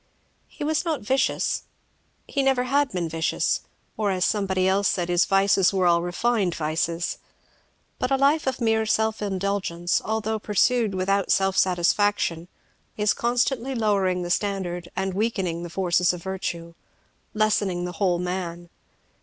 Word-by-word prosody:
He - - -8
was 310 +2 0
not 325 -4 -2
vicious, 260 +5 0 0.6
he 280 - -1
never 265 -2 +2
had 280 +2 +1
been 180 -6 -2
vicious, 165 0 0 0.4
or, 210 -2 0
as 185 -2 +1
somebody 190 -3 +1
else 195 +1 +2
said, 175 -1 -1
his 175 0 +3
vices 195 -1 +3
were 190 -2 +1
all 170 -1 +4
refined 185 +1 0
vices; 165 +2 -2 0.8
but 250 - -1
a 270 - +3
life 280 +2 +2
of 260 -2 -1
mere 220 -2 +1
self 220 0 +1
indulgence 190 -3 -1
although 220 0 -2
pursued 210 0 +1
without 195 +1 0
self 195 -1 +2
satisfaction, 180 -1 +1 0.5
is 210 -1 +2
constantly 245 +2 0
lowering 195 -5 +1
the 175 - -4
standard 180 -3 -2
and 190 0 -2
weakening 190 -5 -1
the 175 - -6
forces 180 0 +1
of 175 - -8
virtue, 175 -3 -4 0.6
lessening 205 -4 +1
the 180 - -4
whole 180 -3 +3
man. 175 -1 -4
195 Hz, 145 wpm, -24 LUFS, 175-220 Hz, 0.8 s, all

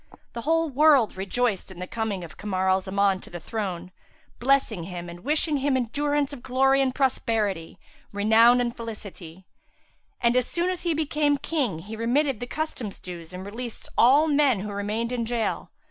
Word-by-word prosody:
The 235 - -5
whole 325 +4 +2
world 285 -5 +4
rejoiced 200 +2 -1
in 190 - -11
the 180 - -5
coming 210 -3 -3
of 165 - -10
Kamar 190 -2 -2
al 190 0 +2
Zaman 195 0 +1
to - - -14
the 175 - -7
throne, 185 -2 -4 0.5
blessing 240 -8 +1
him 175 -1 -6
and 170 0 -9
wishing 300 - +1
him 275 -1 +1
endurance 290 +4 0
of 265 - -8
glory 270 +2 +3
and 260 -1 0
prosperity, 215 -10 0 0.3
renown 225 +4 +5
and 240 -1 -1
felicity; 200 -6 -9 0.7
and, 235 +1 +2
as 255 -1 +2
soon 350 +1 -1
as 365 - -4
he 340 -3 0
became 295 -1 +1
King, 275 - -1
he 200 +7 -8
remitted 245 +3 +1
the 245 - -5
customs 255 -8 -4
dues 170 -3 -9
and 185 +1 -7
released 230 +3 -6
all 280 +6 +5
men 285 -8 +3
who 210 +1 -5
remained 210 +4 -2
in 245 -2 -1
gaol. 230 -1 -2
235 Hz, 175 wpm, -25 LUFS, 195-275 Hz, 0.7 s, renown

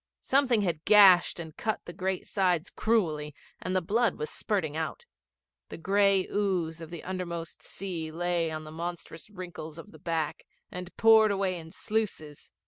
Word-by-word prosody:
Something 260 -5 +3
had 170 -4 -1
gashed 195 -5 +6
and 160 -2 -7
cut 220 -2 -2
the 175 - -8
great 190 +1 -2
sides 180 -4 0
cruelly 155 -10 0 0.3
and 185 +1 -2
the 185 - +1
blood 220 +3 +2
was 150 - -4
spurting 165 -8 -2
out. 160 - -4 0.6
The - - -7
gray 195 +2 +3
ooze 180 -5 -1
of 165 - -8
the 170 -2 -8
undermost 170 -3 -5
sea 170 -5 -5
lay 170 0 0
in 155 0 -5
the 155 - -10
monstrous 170 +1 -6
wrinkles 175 -5 -8
of 185 +5 -11
the - - -15
back, 165 -4 -3 0.2
and 180 0 -8
poured 220 -1 +7
away 195 -3 0
in 160 -1 -10
sluices. 175 -8 -3
180 Hz, 165 wpm, -29 LUFS, 160-200 Hz, 0.6 s, poured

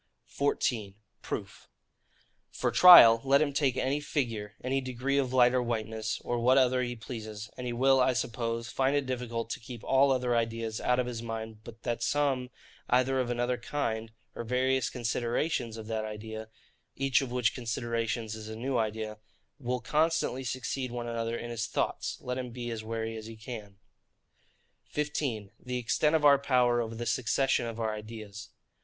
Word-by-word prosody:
14. 115 -7 -1 0.3
Proof. - - -6 0.8
For - - -1
trial, 115 -11 +10
let 140 +1 +4
him 145 -2 +1
take 135 -3 +1
any 135 +3 0
figure, 115 -8 -3
any 135 +2 0
degree 130 +2 -1
of 130 -2 -1
light 125 -1 +5
or 130 - +2
whiteness, 110 -2 -2
or 120 0 -1
what 125 +3 +4
other 130 -1 +4
he 120 -1 -2
pleases, 110 -3 -7
and 125 -1 -5
he 120 - -2
will, 135 +2 +4
I 130 0 +4
suppose, 115 -1 -2
find 135 +2 +1
it 145 -1 +1
difficult 120 -3 -3
to - - -3
keep 115 -1 -9
all 135 +1 +4
other 125 -2 +1
ideas 115 -1 -1
out 125 - +2
of 125 - +1
his 120 -2 -5
mind; 110 -1 -6
but 115 -1 -12
that 120 -1 -2
some, 135 -1 +1 0.4
either 130 +2 +3
of 125 -2 -1
another 120 +1 0
kind, 115 -4 -3 0.2
or - - -5
various 130 +2 +1
considerations 120 0 -1
of 110 - -7
that 110 0 -2
idea, 110 +1 -7 0.5
(each 135 0 +2
of 130 -3 -4
which 125 -2 +1
considerations 115 -2 -2
is 110 -1 -7
a 110 - -6
new 125 +2 -1
idea,) 110 -1 -3 0.4
will 125 -1 -2
constantly 155 -1 +1
succeed 130 +1 -3
one 120 -1 -4
another 115 0 -2
in 120 - -6
his 115 0 -2
thoughts, - - -2
let 125 +1 -3
him 125 -1 -4
be 120 0 -5
as 110 -1 -5
wary 115 0 -3
as 110 0 -8
he 115 - -9
can. 110 -3 -8 1.1
15. 140 -9 -3
The 125 0 -4
extent 150 +6 +2
of 155 -2 +2
our 140 -1 +7
power 125 -3 +3
over 115 0 -4
the 120 +1 -4
succession 130 +1 +1
of 115 0 -6
our 110 -1 -1
ideas. 105 -1 -8
120 Hz, 180 wpm, -30 LUFS, 115-130 Hz, 1.1 s, trial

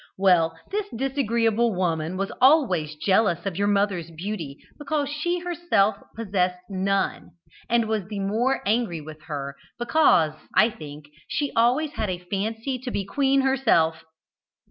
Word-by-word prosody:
Well, 170 -4 +3
this 410 0 -1
disagreeable 235 -4 +1
woman 170 -1 -1
was 195 +1 -2
always 220 - +4
jealous 190 +1 +1
of 195 -3 -2
your 200 +3 0
mother's 200 -4 +1
beauty, 165 -4 -5 0.2
because 290 -1 -1
she 310 +4 -1
herself 330 - +1 0.2
possessed 185 -5 0
none, 195 +1 -1 0.4
and 235 -1 +2
was 215 -4 -2
the 205 -1 -5
more 225 +7 0
angry 210 -5 0
with 155 0 -11
her 140 -3 -5 0.2
because, 235 - +3 0.2
I 225 +2 +5
think, 150 -4 -10 0.2
she 290 -2 -2
always 255 +7 +2
had 215 -8 -3
a 180 - -2
fancy 220 +8 -3
to 255 +1 -6
be 200 -5 -2
queen 275 +5 +2
herself. 225 -12 +2
205 Hz, 145 wpm, -24 LUFS, 175-255 Hz, 0.4 s, I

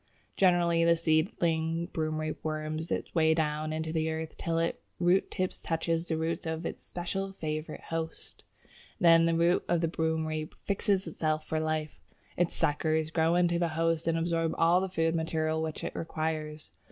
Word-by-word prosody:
Generally 175 -3 +4
the 170 0 +5
seedling 165 0 +1
Broomrape 155 -1 -2
worms 155 +1 -3
its - - -3
way 160 -1 +4
down 155 -1 -1
into 160 0 -3
the 160 -1 0
earth 160 0 -4
till 165 -1 -2
its 165 0 0 0.2
root 180 +2 +3
tip 185 -1 -1
touches 165 +1 -1
the 160 - 0
root 165 +2 -2
of 160 +1 -3
its - - -5
special 195 +2 -4
favourite 155 -3 -4
host, 165 0 -5 0.6
then 165 -3 +6
the 165 - +2
root 170 +2 +3
of 175 0 +2
the 165 - +2
Broomrape 160 -1 -2
fixes 200 -1 +1
itself 155 -1 -1
for 160 - -1
life; 155 -1 -2 0.3
its 175 -1 0
suckers 155 0 +1
grow 165 +1 +2
into 175 -1 +3
the 170 - +2
host 165 0 +1
and 165 0 +2
absorb 165 -1 0
all 170 +2 +4
the 190 - -2
food 165 -2 +1
material 160 -1 0
which 160 -1 -4
it - - -4
requires. 155 -1 -3
165 Hz, 170 wpm, -30 LUFS, 155-170 Hz, 0.6 s, then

